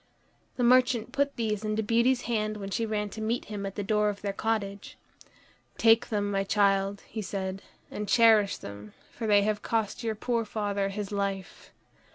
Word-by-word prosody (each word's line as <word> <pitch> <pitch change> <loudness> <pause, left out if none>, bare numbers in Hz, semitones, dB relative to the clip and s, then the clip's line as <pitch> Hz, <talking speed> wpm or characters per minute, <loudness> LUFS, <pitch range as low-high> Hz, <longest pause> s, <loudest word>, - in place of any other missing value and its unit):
The 250 - -1
merchant 245 -1 +4
put 280 0 0
these 215 -2 -2
into 215 +1 -1
Beauty's 235 +4 +2
hand 215 -2 -1
when 200 -1 -6
she 225 +3 -1
ran 210 -1 -2
to 220 - -8
meet 225 +3 -1
him 200 -1 -3
at 195 - -7
the 205 - -3
door 210 +1 +2
of 200 -1 -6
their 200 -1 -2
cottage. 200 -2 -3 0.8
"Take 225 0 +4
them, 205 -2 -1
my 195 -1 +1
child," 195 0 +1
he 220 - -5
said, 190 -1 -4 0.3
"and 210 -1 -5
cherish 220 -4 +5
them, 100 +1 -10 0.2
for 225 - -5
they 205 -1 +5
have 210 0 0
cost 225 0 -2
your 225 -1 -1
poor 230 +2 -1
father 205 -2 -2
his 200 0 -5
life." 200 -2 -4
210 Hz, 185 wpm, -28 LUFS, 200-225 Hz, 0.8 s, cherish